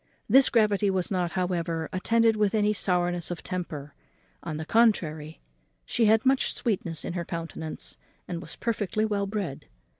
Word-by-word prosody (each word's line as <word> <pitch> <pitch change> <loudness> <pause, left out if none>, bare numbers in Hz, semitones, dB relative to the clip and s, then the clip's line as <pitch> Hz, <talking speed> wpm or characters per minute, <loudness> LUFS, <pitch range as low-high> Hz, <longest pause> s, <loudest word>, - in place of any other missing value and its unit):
This 270 0 +6
gravity 210 -3 +3
was 190 -1 -1
not, 180 -2 -1
however, 170 -3 -1
attended 225 +4 +3
with 210 0 +1
any 210 0 +3
sourness 175 -3 0
of 175 - -5
temper; 155 -6 -5 0.5
on 155 -2 -5
the 160 - -5
contrary, 160 -9 +1 0.5
she 235 - +1
had 220 +3 +4
much 265 0 +2
sweetness 180 - -1
in - - -4
her 175 -1 -2
countenance, 165 -1 -6 0.3
and 170 -2 -4
was 165 -2 -8
perfectly 215 -2 -1
well 200 -2 -1
bred. 195 -9 -4
185 Hz, 155 wpm, -27 LUFS, 170-215 Hz, 0.5 s, This